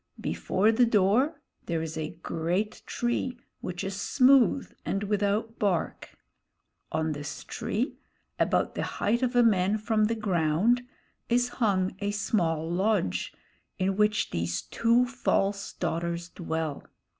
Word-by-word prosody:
Before 205 +4 +1
the 240 +2 +4
door 225 - +3 0.3
there 165 -1 0
is 160 -1 -5
a 160 +1 -5
great 175 +6 -1
tree, 240 +1 -1 0.2
which 180 +1 -5
is 195 0 -4
smooth 270 0 +4
and 195 +1 -2
without 210 +2 0
bark. 195 -5 -1 0.7
On 160 0 0
this 145 0 -6
tree, 240 +7 -3 0.4
about - - +1
the - - -3 0.2
height 235 +4 +1
of 250 -1 0
a 245 - +6
man 200 -2 +3
from 215 0 +1
the 230 +2 0
ground, 195 +3 +2 0.5
is 245 +1 +2
hung 195 -7 0
a 205 - -1
small 170 -6 0
lodge, 175 - 0 0.5
in 190 +1 0
which 210 +1 +2
these 85 0 -2
two 235 +2 +2
false 200 -5 0
daughters 170 0 -2
dwell. 160 -4 -3
200 Hz, 135 wpm, -28 LUFS, 170-230 Hz, 0.7 s, a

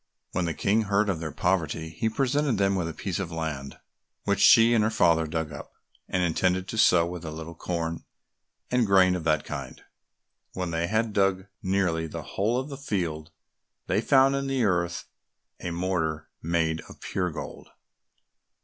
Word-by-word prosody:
When 90 -1 -1
the 85 - -2
King 110 +2 +1
heard 100 +1 +2
of 90 -5 -1
their 80 -2 -4
poverty, 80 -3 -1
he 110 +7 -1
presented 135 +1 +1
them 100 0 +2
with 90 -3 -1
a - - -3
piece 95 +1 -3
of 95 -3 -4
land, 80 -4 -4 0.5
which 100 -1 0
she 115 +1 +7
and 110 -2 +4
her 110 - +2
father 85 -7 +3
dug 80 0 -3
up, 75 - -9 0.4
and 90 -1 +1
intended 90 +2 +1
to 110 - -4
sow 85 -5 +5
with 85 0 -6
a 80 - -5
little 80 +1 -7
corn 85 -1 -3 0.7
and 125 -3 +2
grain 95 -2 +5
of 85 -3 -5
that 75 -1 +2
kind. - - -6 0.7
When 90 -2 -3
they 85 +1 -1
had 110 +2 0
dug 95 -2 +2 0.2
nearly 95 -4 0
the - - -6
whole 110 +5 -1
of 130 +3 -5
the 140 - -6
field, 85 - -3 0.6
they - - +1
found 135 0 +5
in 140 0 -1
the 135 -2 0
earth 85 -4 0 0.5
a 90 - -4
mortar 85 -3 -2
made 80 -1 0
of - - -13
pure 90 -1 -2
gold. 80 - -8
90 Hz, 180 wpm, -27 LUFS, 80-105 Hz, 0.7 s, she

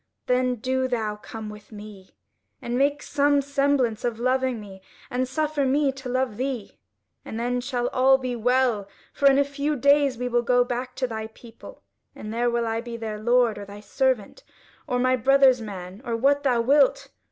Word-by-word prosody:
Then 250 0 +1
do 260 +3 -1
thou 220 -4 -2
come 220 +1 -8
with 210 +1 -11
me, 205 -3 -12 0.4
and 240 - -4
make 285 +3 +1
some 285 0 +2
semblance 275 -5 0
of 235 -2 -2
loving 255 -1 0
me, 195 -2 -11 0.3
and 255 +1 -1
suffer 300 +2 -1
me 275 +1 +2
to 265 -1 -8
love 255 -4 -1
thee. 255 - -4 0.4
And 220 - -6
then 245 +1 -1
shall 245 -1 -2
all 265 +1 +4
be 255 -2 -4
well, 240 -3 +1 0.3
for 280 - +4
in 270 - +4
a 280 - +5
few 285 +2 -2
days 280 -1 +3
we 250 +1 -3
will 240 -1 +1
go 245 +1 +3
back 250 +1 -4
to 255 - -1
thy 220 -2 -5
people, 230 +1 -14 0.3
and 215 +1 -7
there 240 +1 +1
will 235 0 0
I 225 0 -2
be 235 -1 -7
their 220 -2 -5
lord 235 -1 +2
or 200 - -7
thy 200 +1 -11
servant, 260 - -1 0.4
or 250 -3 0
my 255 +1 +2
brother's 260 0 +4
man, 190 -1 -8
or 235 -3 -2
what 280 +4 +2
thou 250 -4 +2
wilt. 275 +3 +3
250 Hz, 190 wpm, -24 LUFS, 225-270 Hz, 0.4 s, a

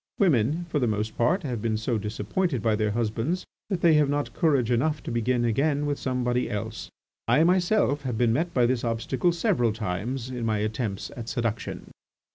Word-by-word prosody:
Women, 160 - +2
for 155 -3 -1
the 125 - +1
most 110 0 -2
part, 175 +11 +2
have 125 -7 -3
been 110 -1 0
so 110 +1 -1
disappointed 110 - -2
by 110 -2 +3
their 105 0 0
husbands 115 - -1 0.2
that 190 -4 -1
they 170 -2 +5
have 150 -2 +4
not 145 0 -1
courage 140 -8 +2
enough 150 +5 +1
to - - -5
begin 120 +1 +1
again 145 +5 +1
with 145 -1 -1
somebody 125 -1 0
else. 110 +2 -5 0.4
I 155 - +4
myself 175 -4 +2
have 125 -5 -3
been 115 -1 +3
met 165 +7 0
by 125 -6 +3
this 125 0 0
obstacle 120 +8 0
several 170 - +1
times 110 +5 -3
in 125 -2 -4
my 110 -1 +1
attempts 105 -1 -3
at 120 -2 -6
seduction." 115 -2 -3
125 Hz, 190 wpm, -26 LUFS, 110-150 Hz, 0.4 s, they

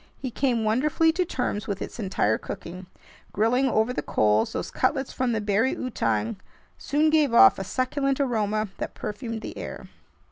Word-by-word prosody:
He 260 - -5
came 240 -2 0
wonderfully 290 +9 +2
to 360 +3 0
terms 245 -8 -3
with 200 -2 -3
its - - -7
entire 185 - 0
cooking. 180 +2 -8 0.5
Grilling 250 +6 +2
over 220 +2 +1
the - - -2
coals, 105 +1 +1
those - - -4
cutlets 265 0 0
from 255 -1 0
the 225 - 0
"bari 210 +5 +1
outang" 115 - -1 0.4
soon 305 +2 +1
gave 295 -6 +3
off 110 - +7
a - - -2
succulent 265 +6 -1
aroma 215 -5 0
that - - -5
perfumed 220 +2 -5
the - - -7
air. - - -7
230 Hz, 170 wpm, -25 LUFS, 205-265 Hz, 0.5 s, off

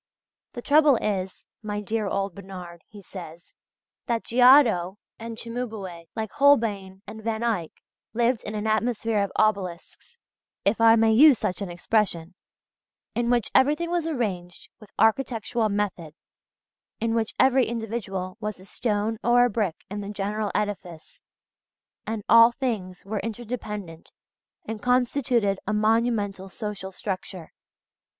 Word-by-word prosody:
"The 240 - -7
trouble 295 -1 +5
is, 190 -4 -3 0.2
my 210 -1 -4
dear 215 +1 -2
old 195 -1 -2
Bernard," 180 -3 -10
he 205 -2 -14
says, 175 -3 -11 0.5
"that 235 -2 -1
Giotto 235 -7 +5 0.2
and 230 0 -7
Cimabue, 220 -8 -5
like 220 -2 -3
Holbein 210 -9 +2
and 220 +1 -9
Van 225 0 -2
Eyck, 210 -9 -1 0.4
lived 235 +1 +1
in 210 - -6
an 210 0 -3
atmosphere 220 0 0
of 200 - -2
obelisks 200 - -2 0.5
if 215 +3 +2
I 225 0 +7
may 225 -1 +4
use 280 +2 +7
such 185 - -3
an 195 - -4
expression 175 -1 -1 0.8
in 235 0 -1
which 240 -3 +1
everything 300 +6 +3
was 345 -2 0
arranged 195 - -4
with 215 -3 -15
architectural 225 0 +1
method, 190 -6 -3 0.8
in 225 0 0
which 225 -2 -1
every 260 -1 +4
individual 220 -5 -4
was 210 -3 -4
a 185 - -13
stone 210 +2 -2
or 245 +1 +5
a 245 - 0
brick 200 -6 -1
in 205 +1 -5
the 200 - -6
general 210 +1 -2
edifice, 190 -6 -4 0.9
and 220 -1 -3
all 230 +1 +8
things 215 -9 -4
were 210 +1 -3
interdependent 210 -7 -6 0.5
and 220 -1 -6
constituted 245 -4 +1
a 215 - 0
monumental 215 -3 0
social 205 -2 -6
structure.... 185 -3 -6
215 Hz, 135 wpm, -25 LUFS, 195-235 Hz, 0.9 s, all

